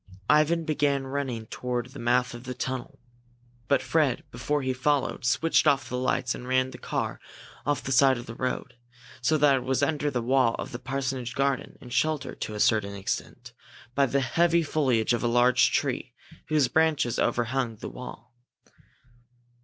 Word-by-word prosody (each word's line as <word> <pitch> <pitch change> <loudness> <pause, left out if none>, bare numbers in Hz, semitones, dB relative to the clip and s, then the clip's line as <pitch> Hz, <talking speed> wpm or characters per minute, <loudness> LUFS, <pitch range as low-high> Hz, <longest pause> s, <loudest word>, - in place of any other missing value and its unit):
Ivan 160 +2 +3
began 145 -3 +1
running 130 -4 -3
toward 125 +2 -3
the 140 - -10
mouth 125 +1 +1
of 120 +1 -9
the 125 0 -5
tunnel. 130 0 -4 0.7
But 140 - +2
Fred, 150 -6 +1
before 140 +5 -1
he 130 0 0
followed, 135 +2 0
switched 160 +6 +3
off 135 -3 +3
the 125 - -3
lights 125 -1 0
and 125 - -8
ran 130 0 +1
the - - -10
car - - -3 0.5
off 145 -2 0
the 135 - -4
side 135 0 +5
of 120 - -7
the 115 - -8
road, 130 +1 -3 0.5
so 155 +6 +2
that 145 -2 +4
it 125 - -4
was 130 +1 0
under 150 0 +1
the 125 -4 -2
wall 130 -1 +3
of - - -6
the 120 - -6
parsonage 130 -2 -3
garden 135 -1 -1
and 125 -1 -10
sheltered, 150 +2 -1
to 105 - -4
a - - -5
certain 100 -2 +2
extent, 100 -1 -5 0.4
by 140 +1 +3
the 140 +2 +1
heavy 170 +6 +2
foliage 130 -7 +1
of 120 - 0
a 120 - +1
large 120 +1 +4
tree, - - -1 0.3
whose 150 -3 +3
branches 155 -4 +1
overhung 120 0 0
the 105 - -8
wall. 125 -1 -10
130 Hz, 175 wpm, -27 LUFS, 120-145 Hz, 0.7 s, side